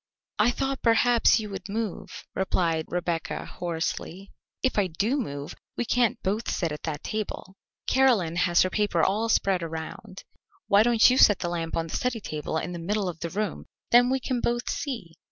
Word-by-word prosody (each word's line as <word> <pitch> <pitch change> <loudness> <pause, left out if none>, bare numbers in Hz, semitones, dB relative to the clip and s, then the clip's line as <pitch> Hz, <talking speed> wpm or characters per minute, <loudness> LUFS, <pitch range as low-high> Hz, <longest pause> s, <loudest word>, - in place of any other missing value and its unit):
"I 210 +3 +5
thought 270 +2 -2
perhaps 235 0 +4
you 210 -2 -6
would 195 0 -7
move," 215 -1 -4
replied 165 -4 0
Rebecca 175 -2 -3
hoarsely. 175 +2 -4 0.3
"If 260 -5 +2
I 195 - +2
do 200 - 0
move, 145 - -4 0.2
we 240 - -1
can't 240 0 +2
both 210 +4 -1
sit 170 -4 -1
at 150 - -6
that 150 -2 -4
table. 215 -3 -4 0.3
Caroline 230 -11 +3
has 175 -1 +4
her 185 - -2
paper 205 -6 +1
all 215 +4 +1
spread 195 -4 +2
around. 165 +5 -7 0.4
Why 200 +1 +5
don't 230 0 +5
you 255 +1 +3
set 205 - +7
the 175 - -3
lamp 165 -1 -3
on 165 - 0
the 165 - -6
study 250 -2 -1
table 155 -4 -4
in 175 - -3
the 175 - -5
middle 200 +3 -1
of 170 -2 -5
the 170 - -3
room, 205 +3 -3 0.3
then 245 +1 +6
we 265 +1 +1
can 250 -1 -2
both 240 +1 -1
see?" 230 - -5
195 Hz, 190 wpm, -26 LUFS, 170-230 Hz, 0.4 s, set